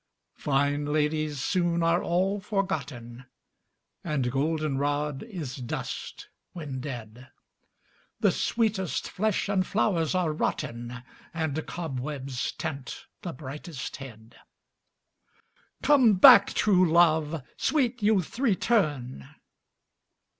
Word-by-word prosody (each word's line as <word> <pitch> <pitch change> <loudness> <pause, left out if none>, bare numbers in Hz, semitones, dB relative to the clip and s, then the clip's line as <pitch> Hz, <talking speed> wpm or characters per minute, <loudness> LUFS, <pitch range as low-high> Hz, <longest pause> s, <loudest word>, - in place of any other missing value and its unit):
Fine 145 +1 0
ladies 150 0 0
soon 170 +2 +1
are 165 +1 +3
all 190 +4 0
forgotten, 140 - -4 0.8
And 140 -6 -1
goldenrod 145 0 -1
is 170 - -6
dust 125 -3 -6 0.3
when 145 -6 -6
dead, 125 -3 -8 0.9
The - - +4
sweetest 210 -6 -1
flesh 215 +1 -1
and 195 -2 +2
flowers 185 -4 0
are 175 -4 +1
rotten 120 -4 -3 0.3
And 160 -2 -2
cobwebs 135 -4 -4
tent 140 -5 -6 0.2
the 175 - -4
brightest 145 +1 -7
head. 115 -4 -12 1.5
Come 255 -8 +5
back, 190 +2 +8
true 185 -5 +3
love! 160 -3 +3
Sweet 250 -6 0
youth, 205 0 +1
return! 155 - 0
155 Hz, 95 wpm, -27 LUFS, 135-185 Hz, 1.5 s, back